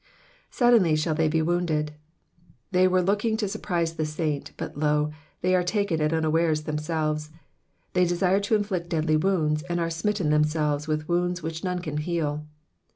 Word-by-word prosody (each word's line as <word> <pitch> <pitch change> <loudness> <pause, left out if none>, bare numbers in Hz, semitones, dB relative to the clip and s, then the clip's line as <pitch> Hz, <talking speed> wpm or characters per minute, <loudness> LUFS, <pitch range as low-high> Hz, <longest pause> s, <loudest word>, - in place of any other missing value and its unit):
^'Suddenly 230 -11 +4
shall 155 +1 0
they 160 0 +2
be 160 +1 +1
wo^mded.'''' 160 -2 0 0.8
They 185 0 +4
were 185 0 +2
looking 210 +4 +1
to 215 -2 -1
surprise 175 -5 -2
the 155 - 0
saint, 150 -2 -3
but, - - -5
lo! 150 0 +1 0.3
they 185 +1 +2
are 185 - +4
taken 180 -3 0
at 150 0 +2
unawares 160 -1 +1
themselves; 155 0 -2 0.6
they 180 0 +4
desired 180 +3 +2
to 220 - +2
inflict 190 -5 -2
deadly 155 -1 +1
wounds, 155 -3 +1
and 175 0 0
aie 165 -1 0
smitten 170 0 0
themselves 150 -1 +1
with 155 0 -2
wounds 175 0 0
which 160 0 -4
none 180 -1 -1
can 155 -4 -4
heal. 150 -2 -2
165 Hz, 165 wpm, -26 LUFS, 155-180 Hz, 0.8 s, ^'Suddenly